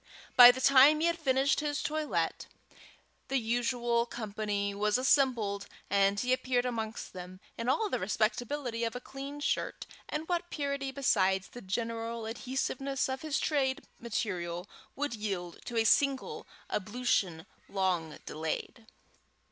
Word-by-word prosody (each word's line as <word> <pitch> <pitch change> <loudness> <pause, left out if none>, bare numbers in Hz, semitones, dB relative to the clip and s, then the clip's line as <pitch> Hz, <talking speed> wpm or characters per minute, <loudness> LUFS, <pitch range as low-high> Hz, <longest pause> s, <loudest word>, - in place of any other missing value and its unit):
By 245 -1 +12
the 245 +1 +2
time 275 +3 +7
he 320 - +2
had 340 0 +1
finished 270 -2 +2
his 295 -1 -2
toilet, 305 0 -1 0.8
the 270 - +1
usual 240 0 0
company 210 -3 -3
was 210 +2 +1
assembled, 245 -7 +2 0.2
and 200 0 +3
he 250 +2 +2
appeared 255 -1 +1
amongst 225 -2 -4
them 185 0 -9 0.2
in 230 +2 -2
all 430 +11 +2
the - - -1
respectability 230 +5 -1
of 230 +1 -2
a - - -3
clean 275 +3 -8
shirt - - -1 0.2
and 310 +2 -3
what 350 0 -1
purity 280 -2 -2
besides 195 -8 +2
the 245 - -10
general 230 +3 -3
adhesiveness 265 +4 -2
of 260 0 -3
his 310 -2 -1
trade 270 -3 0 0.2
material 185 -6 -3 0.3
would 290 -2 -2
yield 195 -6 -4
to 240 - -4
a 225 - +4
single 270 +4 +2 0.2
ablution 200 -5 0 0.2
long 180 -5 -1
delayed. 160 +8 -4
240 Hz, 140 wpm, -31 LUFS, 205-270 Hz, 0.8 s, By